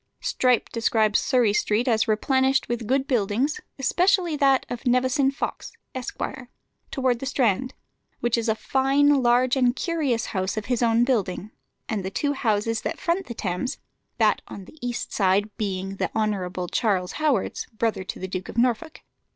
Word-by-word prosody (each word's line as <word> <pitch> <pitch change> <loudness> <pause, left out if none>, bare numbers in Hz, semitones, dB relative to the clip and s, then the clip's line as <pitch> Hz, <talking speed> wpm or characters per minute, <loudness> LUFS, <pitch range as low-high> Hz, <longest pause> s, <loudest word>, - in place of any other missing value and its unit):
Strype 255 - +1
describes 220 -2 +2
Surrey 245 -6 +2
Street 215 +4 +1
as 225 -1 +2
replenished 265 +5 +2
with 240 -2 -3
good 265 +2 +1
buildings, 245 +3 0 0.2
especially 350 +4 +2
that 275 -2 +3
of 245 +2 -5
Nevison 260 +3 +3
Fox, 275 - -5 0.2
Esq., 255 -1 -6 0.7
towards 255 -3 0
the 270 - -4
Strand, 255 -2 0 0.4
"which 240 -1 +1
is 230 -1 -1
a 220 - +2
fine, 275 +3 +3
large, 245 +1 +3
and 250 -2 +2
curious 295 -10 -1
house 190 +1 -1
of 215 - -3
his 245 -2 -1
own 230 0 +3
building," 215 -5 -1 0.4
and 210 -4 -2
the 190 - -3
two 285 +8 -1
houses 225 -3 0
that - - -4
front 350 +2 -1
the 235 - -6
Thames, 190 +4 -3 0.4
that - - +3
on 195 - -9
the 310 - -16
east 245 0 -4
side 200 +1 +1
being 195 -3 -3
the - - -1
Hon. 210 -4 0 0.2
Charles 190 -5 +1
Howard's, 290 -10 -1
brother 220 -3 -2
to - - -6
the 190 - -5
Duke 185 0 -5
of - - -8
Norfolk. 245 +6 0
240 Hz, 165 wpm, -24 LUFS, 210-265 Hz, 0.7 s, that